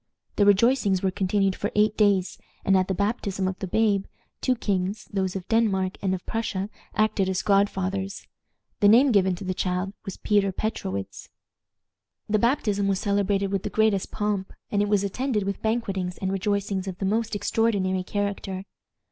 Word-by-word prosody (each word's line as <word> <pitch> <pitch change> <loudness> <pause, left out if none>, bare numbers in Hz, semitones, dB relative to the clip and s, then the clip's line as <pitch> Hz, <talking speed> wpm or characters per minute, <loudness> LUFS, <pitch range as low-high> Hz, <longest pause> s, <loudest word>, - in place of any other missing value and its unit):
The 205 - +4
rejoicings 205 -2 +3
were 190 - +2
continued 195 0 +1
for 205 - -3
eight 210 0 +3
days, 200 -3 +2 0.3
and 195 - +4
at 185 -1 +3
the 190 - -1
baptism 200 -2 -1
of 185 0 -4
the 190 - -4
babe, 200 0 +2 0.4
two 255 - +2
kings, 200 -2 -2
those 190 -2 -1
of 185 -2 -5
Denmark 195 -5 +1
and 190 -1 +1
of 180 - -9
Prussia, 210 -3 -3 0.2
acted 215 -3 +2
as 185 -1 -1
godfathers. 195 -1 0 0.5
The 205 - +5
name 250 +6 +6
given 190 -4 +3
to 180 - -8
the 185 0 -2
child 180 +1 -2
was 195 - -7
Peter 205 -2 +2
Petrowitz. 100 - -4 1.0
The 215 0 +2
baptism 210 -4 +1
was 195 -1 +1
celebrated 200 -1 0
with 195 -2 0
the 210 - -4
greatest 210 -2 +1
pomp, 205 -2 -2 0.2
and 205 - +2
it 205 - 0
was 205 -1 +2
attended 215 +2 -1
with 200 0 -3
banquetings 200 -6 -1
and 190 -1 -2
rejoicings 195 -1 -1
of 185 -2 -5
the 195 - -3
most 220 +2 0
extraordinary 200 -3 +1
character. 195 -1 -3
200 Hz, 175 wpm, -25 LUFS, 190-210 Hz, 1.0 s, name